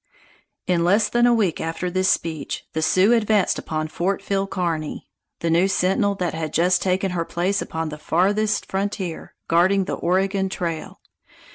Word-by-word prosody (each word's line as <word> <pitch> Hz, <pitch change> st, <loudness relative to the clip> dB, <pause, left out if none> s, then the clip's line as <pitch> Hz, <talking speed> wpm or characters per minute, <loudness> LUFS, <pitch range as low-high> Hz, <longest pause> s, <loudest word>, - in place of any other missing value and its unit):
In 175 Hz, -2 st, +1 dB
less 200 Hz, +5 st, +3 dB
than 240 Hz, 0 st, +3 dB
a -, -, +5 dB
week 200 Hz, -7 st, 0 dB
after 165 Hz, +2 st, -3 dB
this 185 Hz, +1 st, +1 dB
speech, 160 Hz, -4 st, -2 dB
the 160 Hz, -, -1 dB
Sioux 185 Hz, +7 st, +4 dB
advanced 215 Hz, -4 st, +2 dB
upon 155 Hz, 0 st, -3 dB
Fort 185 Hz, +5 st, -1 dB
Phil 195 Hz, 0 st, -1 dB
Kearny, 165 Hz, -5 st, -3 dB, 0.3 s
the 170 Hz, -, 0 dB
new 175 Hz, +3 st, +4 dB
sentinel 195 Hz, +1 st, +1 dB
that 180 Hz, -3 st, -2 dB
had 160 Hz, -1 st, -4 dB
just 180 Hz, +3 st, +3 dB
taken 190 Hz, 0 st, 0 dB
her 175 Hz, -2 st, -1 dB
place 185 Hz, +4 st, -1 dB
upon 160 Hz, 0 st, -4 dB
the 150 Hz, 0 st, -8 dB
farthest 205 Hz, +7 st, +1 dB
frontier, 195 Hz, -3 st, -4 dB
guarding 185 Hz, +3 st, +3 dB
the -, -, -3 dB
Oregon 190 Hz, +2 st, 0 dB
Trail. 170 Hz, -4 st, -5 dB
185 Hz, 165 wpm, -22 LUFS, 165-195 Hz, 0.3 s, a